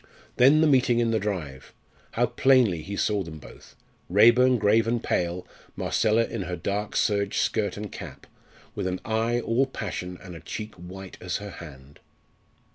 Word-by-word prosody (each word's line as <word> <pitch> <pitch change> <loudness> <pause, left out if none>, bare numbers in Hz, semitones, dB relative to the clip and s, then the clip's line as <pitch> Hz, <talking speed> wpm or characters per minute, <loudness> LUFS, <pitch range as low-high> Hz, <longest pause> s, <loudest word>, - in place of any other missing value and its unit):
Then 140 +5 +6
the 160 - +5
meeting 130 -4 +3
in 120 -1 +2
the 110 - +1
drive! 85 -11 -5 0.4
How 120 - +2
plainly 120 -7 +3
he 100 +6 -6
saw 105 0 0
them 80 -4 -7
both 75 - -15 0.3
Raeburn 120 +6 +5
grave 110 +1 +3
and 115 0 -1
pale, 90 +1 -1 0.3
Marcella 110 +2 +1
in 115 - -5
her 90 -1 -4
dark 100 +3 -3
serge 100 -1 +1
skirt 105 -2 0
and 105 0 -6
cap, - - -9 0.5
with - - -3
an 90 0 -2
eye 115 +2 0
all 125 +4 +1
passion 90 -8 -5
and 90 -2 -9
a - - -8
cheek 110 +5 -7
white 90 +2 -10
as 90 -1 -2
her 100 0 -8
hand. 70 -5 -12
105 Hz, 170 wpm, -26 LUFS, 90-115 Hz, 0.5 s, Then